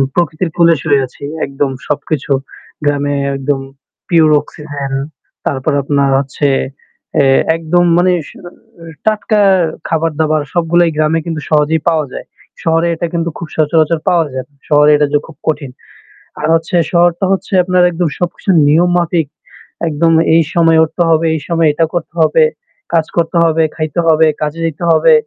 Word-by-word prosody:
প্রকৃতির 170 Hz, 0 st, -1 dB
ফুলে 170 Hz, -1 st, +5 dB
শুয়ে 145 Hz, -3 st, +2 dB
আছি। 140 Hz, -, -17 dB, 0.2 s
একদম 140 Hz, 0 st, -2 dB, 0.2 s
সবকিছু। 145 Hz, 0 st, -3 dB, 0.5 s
গ্রামে 145 Hz, 0 st, 0 dB, 0.2 s
একদম 135 Hz, 0 st, -1 dB, 0.5 s
pure 160 Hz, -3 st, +4 dB
অক্সিজেন 145 Hz, -2 st, -7 dB, 0.5 s
তারপর 140 Hz, +2 st, -1 dB
আপনার 140 Hz, 0 st, +1 dB
হচ্ছে 140 Hz, +1 st, -2 dB, 0.7 s
এ -, -, +3 dB, 0.3 s
একদম 175 Hz, +2 st, +1 dB
মানে 180 Hz, +1 st, +3 dB, 0.2 s
স -, -, -13 dB, 0.2 s
অ -, -, -8 dB, 0.6 s
টাটকা 215 Hz, 0 st, +1 dB, 0.5 s
খাবার-দাবার 155 Hz, -1 st, 0 dB
সবগুলাই 175 Hz, 0 st, +2 dB
গ্রামে 155 Hz, +1 st, +1 dB
কিন্তু 165 Hz, -3 st, -4 dB
সহজেই 155 Hz, 0 st, +2 dB
পাওয়া 160 Hz, -2 st, 0 dB
যায়। -, -, -7 dB, 0.4 s
শহরে 165 Hz, 0 st, +1 dB
এটা 170 Hz, +1 st, -3 dB
কিন্তু 170 Hz, 0 st, -1 dB
খুব 170 Hz, -, -7 dB
সচরাচর 155 Hz, +1 st, +2 dB
পাওয়া 170 Hz, -2 st, +2 dB
যায় 130 Hz, -1 st, -4 dB
না। -, -, -36 dB, 0.2 s
শহরে 150 Hz, 0 st, +5 dB
এটা 145 Hz, 0 st, +2 dB
যে 145 Hz, -, +5 dB
খুব 160 Hz, -, -14 dB
কঠিন। 145 Hz, -4 st, -2 dB, 0.7 s
আর 150 Hz, -, -1 dB
হচ্ছে 165 Hz, +2 st, -2 dB, 0.2 s
শহরটা 175 Hz, +1 st, +2 dB
হচ্ছে 195 Hz, -, -2 dB
আপনার 180 Hz, 0 st, +2 dB
একদম 170 Hz, -1 st, -1 dB
সবকিছু 175 Hz, +2 st, -2 dB, 0.2 s
নিয়ম 165 Hz, +4 st, +3 dB
মাফিক। 170 Hz, -3 st, 0 dB, 0.6 s
একদম 165 Hz, +2 st, +1 dB, 0.2 s
এই 165 Hz, -, +5 dB
সময়ে 165 Hz, -1 st, +4 dB
উঠতে 160 Hz, +2 st, -1 dB
হবে, 160 Hz, 0 st, +2 dB
এই 155 Hz, -, -4 dB
সময়ে 165 Hz, -2 st, +2 dB
এটা 165 Hz, +2 st, +1 dB
করতে 175 Hz, -1 st, -4 dB
হবে। 315 Hz, -, +4 dB, 0.5 s
কাজ 165 Hz, -2 st, +2 dB
করতে 170 Hz, 0 st, 0 dB
হবে, 165 Hz, 0 st, +2 dB
খাইতে 155 Hz, +1 st, -3 dB
হবে, 160 Hz, 0 st, +4 dB
কাজে 150 Hz, +2 st, -3 dB
যাইতে 160 Hz, +1 st, -4 dB
হবে। 160 Hz, 0 st, +4 dB
160 Hz, 155 wpm, -14 LUFS, 150-170 Hz, 0.7 s, ফুলে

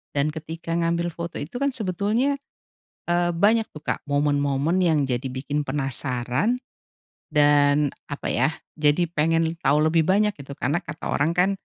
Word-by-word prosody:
dan 145 Hz, +1 st, +2 dB
ketika 160 Hz, +2 st, -7 dB
ngambil 170 Hz, 0 st, 0 dB
foto 170 Hz, +1 st, -6 dB
itu 155 Hz, +12 st, -6 dB
kan 280 Hz, 0 st, 0 dB
sebetulnya, 220 Hz, +6 st, 0 dB, 0.7 s
eee, 175 Hz, 0 st, +2 dB
banyak 215 Hz, +5 st, +3 dB
tuh 150 Hz, -, -10 dB
Kak -, -, -3 dB
momen-momen 145 Hz, +2 st, +1 dB
yang 160 Hz, -5 st, +3 dB
jadi 125 Hz, +1 st, -1 dB
bikin 140 Hz, +3 st, -3 dB
penasaran 135 Hz, -, 0 dB, 0.7 s
dan 145 Hz, 0 st, +4 dB, 0.2 s
apa 145 Hz, -, -5 dB
ya, 130 Hz, +4 st, +2 dB, 0.3 s
jadi 150 Hz, +3 st, +3 dB
pengen 165 Hz, +1 st, +1 dB
tau 145 Hz, 0 st, +3 dB
lebih 160 Hz, +1 st, +3 dB
banyak 210 Hz, +3 st, +3 dB
gitu 140 Hz, 0 st, -9 dB
karena 150 Hz, +4 st, 0 dB
kata 145 Hz, +2 st, -8 dB
orang 145 Hz, +3 st, +2 dB
kan, 180 Hz, +2 st, +4 dB
155 Hz, 150 wpm, -24 LUFS, 145-175 Hz, 0.7 s, dan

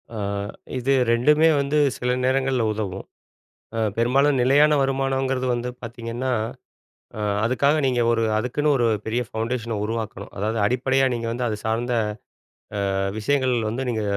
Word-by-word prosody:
ஆ -, -, -5 dB, 0.6 s
இது 130 Hz, +2 st, +1 dB, 0.2 s
ரெண்டுமே 150 Hz, +7 st, +4 dB
வந்து 140 Hz, +2 st, 0 dB, 0.2 s
சில 125 Hz, 0 st, -1 dB
நேரங்கள்ல 130 Hz, -1 st, +1 dB
உதவும். 100 Hz, -3 st, -4 dB, 0.7 s
அ -, -, 0 dB, 0.2 s
பெரும்பாலும் 135 Hz, +4 st, +3 dB
நிலையான 145 Hz, +4 st, +5 dB
வருமானம்ங்கிறது 135 Hz, -1 st, 0 dB
வந்து 120 Hz, +1 st, -2 dB
பார்த்தீங்கன்னா, 115 Hz, +2 st, -4 dB, 0.9 s
அ -, -, -5 dB, 0.3 s
அதுக்காக 130 Hz, +5 st, +2 dB
நீங்க 125 Hz, -2 st, +1 dB
ஒரு, 115 Hz, -1 st, +1 dB
அதுக்குன்னு 125 Hz, +7 st, 0 dB
ஒரு 120 Hz, -2 st, +2 dB, 0.2 s
பெரிய 115 Hz, +3 st, 0 dB
ஃபவுண்டேஷன 115 Hz, 0 st, -3 dB
உருவாக்கணும். 110 Hz, -2 st, -4 dB
அதாவது, 110 Hz, +3 st, -1 dB
அடிப்படையா 130 Hz, +4 st, +2 dB
நீங்க 115 Hz, -1 st, -3 dB
வந்து 120 Hz, +1 st, -2 dB
அது 110 Hz, -2 st, -2 dB
சார்ந்த 115 Hz, +2 st, 0 dB, 1.0 s
அ -, -, 0 dB, 0.2 s
விஷயங்கள் 130 Hz, +3 st, +1 dB
வந்து 120 Hz, +5 st, -3 dB
நீங்க 110 Hz, -3 st, -1 dB
125 Hz, 135 wpm, -23 LUFS, 115-135 Hz, 1.0 s, நிலையான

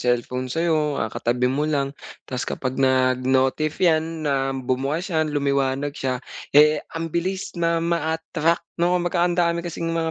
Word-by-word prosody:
cellphone 125 Hz, +1 st, 0 dB
sa'yo, 155 Hz, -1 st, +1 dB
ah, -, -, 0 dB
katabi 120 Hz, +1 st, 0 dB
mo 145 Hz, +4 st, 0 dB
lang 140 Hz, -2 st, 0 dB, 0.3 s
'tas 130 Hz, -1 st, -3 dB
kapag 130 Hz, -1 st, -3 dB
nag-notif 130 Hz, +3 st, +2 dB
'yan 160 Hz, -2 st, +1 dB
na 135 Hz, -1 st, +1 dB
bumukas 135 Hz, +8 st, -2 dB
'yan, 155 Hz, -1 st, +1 dB
lumiwanag 140 Hz, -1 st, 0 dB
siya, 130 Hz, -3 st, -2 dB, 0.4 s
eh, 150 Hz, 0 st, +6 dB
ang 165 Hz, -1 st, -4 dB
bilis 185 Hz, +3 st, -2 dB
na 170 Hz, -1 st, +1 dB
ma-attract, 165 Hz, 0 st, 0 dB, 0.2 s
'no? 180 Hz, +1 st, +3 dB
Kumbaga, 175 Hz, 0 st, 0 dB
andami 170 Hz, -1 st, +1 dB
kasing 170 Hz, -1 st, -4 dB
mga 165 Hz, -1 st, -1 dB
155 Hz, 150 wpm, -23 LUFS, 130-170 Hz, 0.4 s, eh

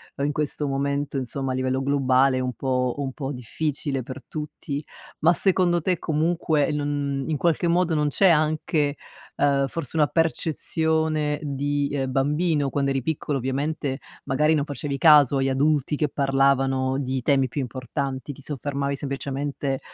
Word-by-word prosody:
uhm, 140 Hz, -, -1 dB
in 145 Hz, -, +1 dB
questo 150 Hz, 0 st, -2 dB
momento, 140 Hz, +1 st, -1 dB
insomma, 135 Hz, +1 st, -3 dB
a 130 Hz, -, -1 dB
livello 130 Hz, +1 st, 0 dB
globale 135 Hz, -1 st, +3 dB
è -, -, 0 dB
un 125 Hz, 0 st, -2 dB
po' 125 Hz, -1 st, -1 dB
un 140 Hz, -2 st, -2 dB
po' 140 Hz, -1 st, -4 dB
difficile 135 Hz, +2 st, -3 dB
per 130 Hz, +2 st, -8 dB
tutti. 150 Hz, -1 st, -5 dB, 0.4 s
Ma 165 Hz, +3 st, +5 dB
secondo 180 Hz, -1 st, +3 dB
te 180 Hz, 0 st, 0 dB
comunque 160 Hz, -1 st, +1 dB
non 145 Hz, -2 st, -2 dB
in 155 Hz, -2 st, 0 dB
qualche 170 Hz, +1 st, +1 dB
modo 170 Hz, -1 st, +2 dB
non 150 Hz, -1 st, +2 dB
c'è 190 Hz, +6 st, +4 dB
anche, 155 Hz, -2 st, +1 dB, 0.4 s
ehm, 140 Hz, -1 st, +2 dB
forse 165 Hz, 0 st, -5 dB
una 150 Hz, -1 st, +4 dB
percezione 160 Hz, -1 st, 0 dB
di, 145 Hz, 0 st, -1 dB
ehm, 135 Hz, -2 st, -1 dB
bambino, 145 Hz, +1 st, +1 dB
quando 140 Hz, 0 st, 0 dB
eri 135 Hz, -2 st, -1 dB
piccolo 150 Hz, -1 st, -1 dB
ovviamente, 135 Hz, +2 st, -2 dB, 0.2 s
magari 150 Hz, +3 st, +2 dB
non 145 Hz, -, 0 dB
facevi 145 Hz, -1 st, -4 dB
caso 145 Hz, -3 st, +6 dB
agli 135 Hz, 0 st, +1 dB
adulti 145 Hz, +2 st, +1 dB
che 150 Hz, 0 st, 0 dB
parlavano 135 Hz, -1 st, +2 dB
di 130 Hz, -1 st, -2 dB
temi 135 Hz, +1 st, +2 dB
più 140 Hz, -, -3 dB
importanti, 130 Hz, +2 st, -4 dB
ti 140 Hz, -, -14 dB
soffermavi 140 Hz, 0 st, -3 dB
semplicemente 140 Hz, 0 st, -3 dB
140 Hz, 160 wpm, -24 LUFS, 135-150 Hz, 0.4 s, caso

